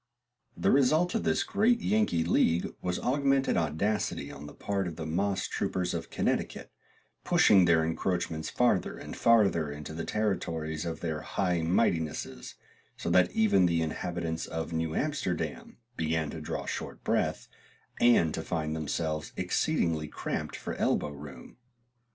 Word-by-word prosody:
The - - +2
result 155 - +3
of 225 - -1
this - - +2
great 230 +3 +2
Yankee 105 - +1
league 85 0 +2
was 90 -1 -1
augmented 135 +1 +2
audacity 85 +7 -1
on 75 +1 -9
the 75 - -10
part 100 -2 -2
of 85 - -5
the 80 - -5
moss 95 +5 0
troopers 90 -1 -2
of - - -4
Connecticut, - - -2 0.5
pushing 95 -3 +5
their 80 -2 +4
encroachments 80 -1 -2
farther 120 -7 +1
and - - -8
farther 100 -10 +3
into 75 +1 -7
the 85 +1 -4
territories 80 -7 -2
of 80 -1 -4
their 80 -3 -2
High 90 -1 0
Mightinesses, 80 -2 -1 0.4
so 85 - -3
that 90 0 +4
even 100 -4 +4
the 85 -1 +1
inhabitants 85 0 -3
of 80 +1 -4
New 80 0 -1
Amsterdam 135 - -2 0.2
began 80 -1 0
to 80 - -7
draw 75 - -4
short - - -5
breath, - - 0 0.5
and 115 -10 +5
to - - -2
find 80 -1 -2
themselves 80 0 -2
exceedingly 80 -2 0
cramped - - -4
for - - -5
elbow 75 - +1
room. 70 +4 -11
85 Hz, 145 wpm, -29 LUFS, 80-100 Hz, 0.5 s, pushing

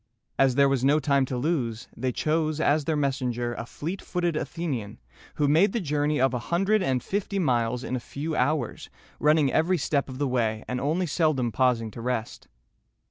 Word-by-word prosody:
As 135 -2 +4
there 140 0 +5
was 135 -2 0
no 145 +3 +4
time 140 -3 +2
to 130 -1 -4
lose, 125 -6 -1
they 130 +2 -1
chose 155 +3 0
as 150 -1 +2
their 160 - 0
messenger 125 -4 -1
a 115 0 -6
fleet 170 +10 -5
footed 175 -2 -1
Athenian, 145 -11 -3 0.4
who 145 - +1
made 165 +7 +4
the 235 - 0
journey 150 -3 0
of 130 0 +3
a 125 - -1
hundred 195 +5 +2
and 130 -6 0
fifty 200 0 -2
miles 125 -7 +1
in 130 - -3
a - - -1
few 150 +6 -5
hours, 130 -2 -1 0.3
running 150 -2 +3
every 175 +4 +2
step 140 -2 0
of 130 - -7
the 145 0 0
way, 115 -4 -1
and 125 0 -3
only 160 +6 0
seldom 145 -6 +1
pausing 120 -3 +1
to 115 - -8
rest. 120 -2 -3
140 Hz, 190 wpm, -26 LUFS, 125-155 Hz, 0.4 s, there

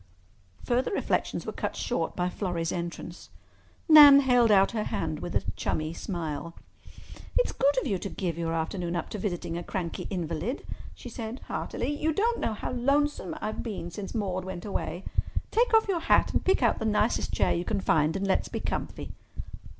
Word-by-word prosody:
Further 245 +1 +1
reflections 400 - -1
were - - -3
cut - - -3
short 170 -9 -2
by 180 0 0
Florrie's 175 -3 -2
entrance. 170 0 -6 0.6
Nan 295 -3 +10
held 245 -3 +4
out 195 -2 +5
her 220 -3 -2
hand 155 -2 -2
with 175 - -5
a - - +2
chummy 155 +1 -2
smile. 170 -3 -4 0.8
"It's - - +3
good 280 0 +2
of - - -5
you 200 -8 0
to 200 - -4
give 175 -5 -3
your 165 -1 -2
afternoon 170 +2 -2
up 170 - -3
to 210 - -4
visiting 175 -4 -3
a - - -6
cranky 170 -2 -4
invalid," 180 - -3 0.3
she - - -10
said 230 +1 -6
heartily. 290 - -3
"You 315 +1 +2
don't 465 +7 +1
know 225 - -1
how - - -4
lonesome 280 -3 0
I've 215 - -3
been 195 -6 -5
since 195 +2 -6
Maude 190 -4 -1
went 185 0 -6
away. 195 -2 -3 0.5
Take 475 +3 +3
off 445 -1 +5
your 375 -4 +1
hat - - +3
and - - +1
pick 375 -8 +2
out 235 - +3
the - - -2
nicest 215 +1 +1
chair - - +2
you 170 - -1
can 205 +1 -1
find, 155 -3 +2
and 195 0 -1
let's 195 - +1
be - - -3
comfy." - - -4
195 Hz, 190 wpm, -28 LUFS, 170-250 Hz, 0.8 s, Nan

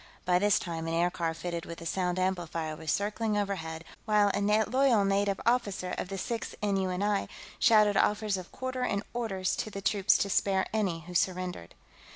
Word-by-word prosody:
By 180 -1 +3
this 205 +1 +4
time, 165 -2 -4
an 165 - -1
aircar 170 -1 0
fitted 170 0 -5
with 170 0 -7
a 165 - -9
sound 180 +1 -1
amplifier 170 -4 -2
was 160 -1 -3
circling 210 +1 0
overhead, 165 -5 -3 0.2
while 210 -2 +4
a 200 - 0
loyal 220 +2 +3
native 195 0 +1
officer 205 -6 0
of - - -4
the 195 - -4
Sixth 230 +4 -4
N.U.N.I. 195 0 0 0.3
shouted 215 -3 +5
offers 210 +1 +2
of 185 -2 -7
quarter 260 0 -4
and 200 -4 0
orders 195 -6 -1
to - - -3
the 200 - -6
troops 195 0 +3
to 200 - -1
spare 190 -1 +2
any 190 -7 0
who 175 +3 -10
surrendered. 180 - -1
195 Hz, 180 wpm, -29 LUFS, 180-210 Hz, 0.3 s, shouted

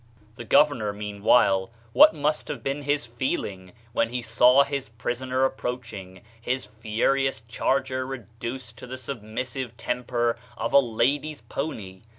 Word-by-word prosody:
The 120 - -8
governor, 120 -5 +4
meanwhile, 100 -1 +2 0.2
what - - +8
must 150 +1 0
have 150 - -5
been 135 +2 -2
his 145 -2 0
feelings 100 -6 -3 0.2
when 115 - +2
he 125 0 -3
saw 125 +4 +6
his 140 -4 -4
prisoner 125 +3 -1
ap 135 - -2
proaching, 100 -7 -6 0.2
his 125 +2 -2
furious 115 +4 0
charger 130 +3 -1
reduced 120 -1 -7
to - - -9
the 130 +1 -6
submissive 120 0 -5
temper 120 -1 -1 0.2
of - - -2
a 140 - +9
lady's 140 +5 0
pony? 100 -10 -5
125 Hz, 140 wpm, -26 LUFS, 110-135 Hz, 0.2 s, a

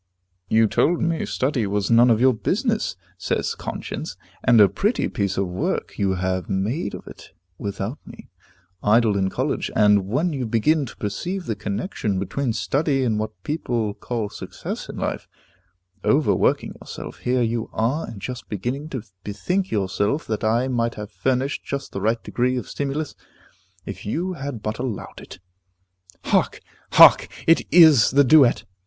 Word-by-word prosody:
"You 110 0 +4
told 165 +10 +2
me 165 -1 -1
study 130 -5 0
was 100 +2 -1
none 120 +2 +6
of 110 -2 +4
my 130 +1 +6
business," 220 - -1 0.2
says - - -1
Conscience, - - -6 0.3
"and 120 -3 +5
a 105 - +8
pretty 210 - 0
piece 100 -2 -2
of 95 -1 0
work 90 +1 -3
you 95 -1 +1
have 95 0 -2
made 100 - -2
of - - -10
it - - -12 0.3
without 100 +5 -4
me. - - -13 0.5
Idle 110 0 +3
in 95 -1 +1
college, - - -2
and, 105 -2 +4
when 150 - 0
you 130 -4 -3
began 135 +7 +2
to - - -12
perceive 175 - -4
the 110 - -2
connection 100 - -3
between 115 +7 -2
study 135 +6 0
and 110 -4 0
what 105 -4 -5
people 120 -8 -2
call 110 -2 -4
success - - -7
in - - -7
life, - - -3 0.8
overworking 145 +2 +2
yourself, - - -8
here 125 0 +1
you 115 0 -2
are, 125 +8 -1
and 105 - -8
just 125 +4 -7
beginning 125 - -4
to 130 -7 -5 0.2
bethink 180 - -2
yourself 100 +7 -1
that 110 -1 -3
I 115 +4 +2
might 120 -2 -1
have 105 0 -7
furnished 130 +4 -1
just 140 0 -5
the 100 - -5
right 115 +3 0
degree 125 +1 0
of 125 - -4
stimulus, 145 +2 -3 0.7
if - - -7
you 175 - -2
had 140 -8 -6
but 110 +1 -3
allowed 125 -5 -5
it." - - -11 0.9
Hark! - - +1 0.3
hark! - - +8 0.2
It 165 - +4
is 160 -9 +7
the 140 +2 +5
duet! 130 -5 +5
120 Hz, 160 wpm, -23 LUFS, 105-140 Hz, 0.9 s, a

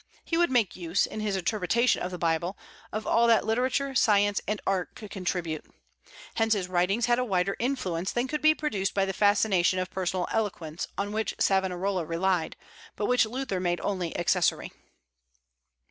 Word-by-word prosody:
He 330 - -1
would 345 +1 +3
make 240 -7 +1
use, 175 0 0
in 215 - -7
his 210 -2 -1
interpretation 215 +5 +1
of 180 - -2
the 180 - -6
Bible, 170 +3 -1 0.3
of 215 +1 -4
all 235 0 +3
that 230 -1 +4
literature, 260 +5 0
science, 205 -5 +3
and 210 +1 -1
art 190 -2 -1
could 210 -2 -10
contribute. 175 -4 -3 0.7
Hence 225 0 +2
his 195 -4 -1
writings 185 +5 +1
had 240 0 +2
a - - +1
wider 195 -4 0
influence 190 -9 -1
than 240 +2 -1
could 300 +3 -3
be 310 0 +5
produced 210 -12 -2
by 195 -1 +2
the 195 - -3
fascination 200 -3 +3
of 185 0 -2
personal 185 -1 -2
eloquence, 180 -7 -2
on 205 +1 -2
which 220 +1 -2
Savonarola 190 -1 +1
relied, 170 +1 0 0.4
but 210 - -2
which 250 -1 +3
Luther 245 -5 -3
made 175 -1 0
only 185 -4 -2
accessory. 175 0 +1
195 Hz, 175 wpm, -27 LUFS, 180-225 Hz, 0.7 s, be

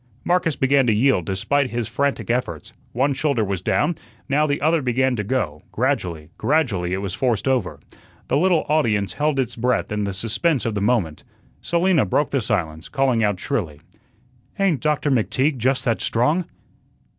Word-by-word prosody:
Marcus 175 -4 +1
began 135 -1 +3
to 110 - +4
yield 115 - +2
despite 130 +9 0
his 120 -2 -3
frantic 140 -3 -1
efforts. 100 -11 -3 0.2
One 135 +4 +1
shoulder 135 -4 0
was 95 -3 -2
down, 150 - +1 0.3
now 150 +2 +2
the 145 -1 0
other 160 +2 +2
began 130 0 +1
to 105 - -2
go; 95 - -2
gradually, 90 - -2
gradually 120 - +1
it 95 +2 -2
was 95 -3 -3
forced 115 +2 0
over. 105 - 0 0.5
The - - 0
little 175 0 +2
audience 110 -10 +1
held 150 -2 0
its 130 -4 -1
breath 125 -1 0
in 105 -1 -1
the 100 - -3
suspense 115 - 0
of 115 - -1
the 105 - -2
moment. 100 -9 0 0.4
Selina 170 -2 +2
broke 125 +9 0
the 135 - +1
silence, 85 -8 -2
calling 130 -5 +1
out 105 -3 0
shrilly: 95 - -3 0.8
"Ain't 185 -8 +2
Doctor 150 -1 0
McTeague 130 +4 +1
just 130 +3 0
that 115 -2 0
strong!" 150 +10 +1
125 Hz, 170 wpm, -22 LUFS, 105-145 Hz, 0.8 s, to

